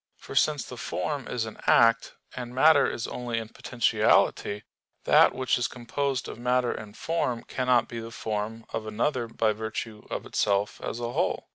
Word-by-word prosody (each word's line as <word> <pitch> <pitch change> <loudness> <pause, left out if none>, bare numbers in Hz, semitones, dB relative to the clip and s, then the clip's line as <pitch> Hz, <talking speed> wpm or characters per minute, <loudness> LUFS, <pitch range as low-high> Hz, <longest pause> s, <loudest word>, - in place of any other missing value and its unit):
For - - -10
since 150 -4 +2
the 125 - -9
form 145 +2 -3
is 120 -2 -2
an 110 - -9
act, 115 0 +4 0.2
and 125 -1 -6
matter 145 +2 +6
is 115 - -4
only 120 -2 -4
in 110 -1 -4
potentiality, 110 -3 +1 0.4
that - - +5
which 130 -1 +1
is 120 - +1
composed 130 +2 -2
of - - -8
matter 125 0 +1
and 105 -1 -8
form 130 -8 -1
cannot 125 -2 +1
be 120 - -6
the 115 0 -7
form 110 0 -4
of 110 -1 -3
another 120 +3 -1
by 115 -1 +1
virtue 110 0 -6
of - - -4
itself 100 0 0
as 115 - -4
a 120 0 -3
whole. - - -1
115 Hz, 175 wpm, -27 LUFS, 110-125 Hz, 0.4 s, matter